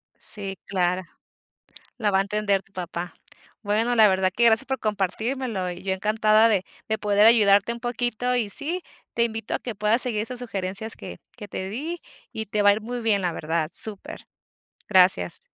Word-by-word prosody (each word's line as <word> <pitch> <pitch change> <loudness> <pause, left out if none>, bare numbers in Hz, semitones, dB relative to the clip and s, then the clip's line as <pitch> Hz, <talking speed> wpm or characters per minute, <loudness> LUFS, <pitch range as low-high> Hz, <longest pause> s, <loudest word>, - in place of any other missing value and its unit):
Sí, 195 -2 -2
claro, 180 -1 0 1.0
lo 210 -3 +1
va 190 - +4
a - - +4
entender 200 -1 0
tu 195 - -30
papá, 175 -3 -5 0.5
bueno, 220 +4 +1
la 220 -2 +7
verdad 190 -1 +2
que 235 - +2
gracias 230 +3 +4
por 265 0 -2
compartírmelo, 215 0 -2
y 175 +1 -8
yo 190 0 -1
encantada 215 +3 +3
de 195 -4 +1 0.2
de 220 0 0
poder 205 0 +4
ayudarte 210 -1 +5
un 235 - -8
poquito, 245 0 -1
y 225 -4 0
sí, 330 - -2 0.3
te 235 - +3
invito 225 -1 -3
a - - +1
que 240 -3 -6
puedas 210 +4 +2
seguir 235 -5 -1
esas 245 +3 -6
sugerencias 205 -2 -4
que - - -9 0.2
que 210 -4 -9
te 190 - -5
di 310 - -5 0.3
y 220 0 -4
te 210 +1 0
va 205 - +7
a - - +6
ir 210 - -2
muy 240 +3 -5
bien, 215 -4 +1
la 175 -2 0
verdad, 160 0 -2
súper, 210 -3 -4 0.6
gracias. 180 - +4
210 Hz, 190 wpm, -24 LUFS, 190-230 Hz, 1.0 s, la